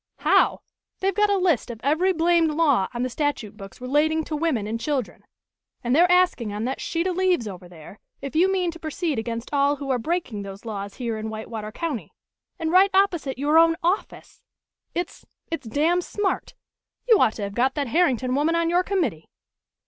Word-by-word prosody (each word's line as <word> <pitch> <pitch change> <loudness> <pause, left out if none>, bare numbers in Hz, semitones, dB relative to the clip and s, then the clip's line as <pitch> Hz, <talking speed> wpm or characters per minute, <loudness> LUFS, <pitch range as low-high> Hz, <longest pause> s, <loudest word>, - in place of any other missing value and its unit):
"How? - - +3 0.4
They've 390 +1 +1
got 420 +2 +2
a 400 - +3
list 345 - +1
of 230 -2 -7
every 315 +7 +2
blamed 335 -1 +3
law 295 - +2
on 240 +1 -3
the - - 0
statute 255 -7 -2
books 195 +1 -11
relating 300 +5 +1
to 310 - -4
women 295 -9 0
and 225 +2 -3
children, 265 -2 -3 0.6
and 245 +2 +1
they're 350 +3 +5
asking 360 - +3
on 210 +1 -4
that 265 +2 -3
sheet 335 +1 -2
of 370 -1 -1
leaves 365 -10 +1
over 180 -3 -9
there, 175 +4 -13 0.2
if 275 0 -7
you 365 +4 +4
mean 365 -3 0
to 335 - -12
proceed 315 -3 -2
against 230 +3 -5
all 285 0 +3
who 280 -1 -4
are 250 - +1
breaking 280 - -2
those 200 +2 -9
laws 200 -3 -5
here 230 -4 -3
in 220 0 -4
Whitewater 220 0 -6
County. 305 -3 -4 0.5
And 325 -2 -2
right 375 +2 +6
opposite 345 -9 +1
your 295 +4 +4
own 330 0 +5
office! 360 +5 -2 0.5
It's 350 0 -4 0.3
it's 280 -7 -4
damn 320 +9 +2
smart. 400 +2 -3 0.5
You 450 -4 +6
ought 215 - +4
to 210 - -6
have 200 0 -4
got 255 +4 +1
that 285 -4 -2
Herrington 260 -5 +2
woman 300 +5 +1
on 335 0 +1
your 355 +1 +4
committee." 325 - -2
290 Hz, 195 wpm, -24 LUFS, 230-345 Hz, 0.6 s, right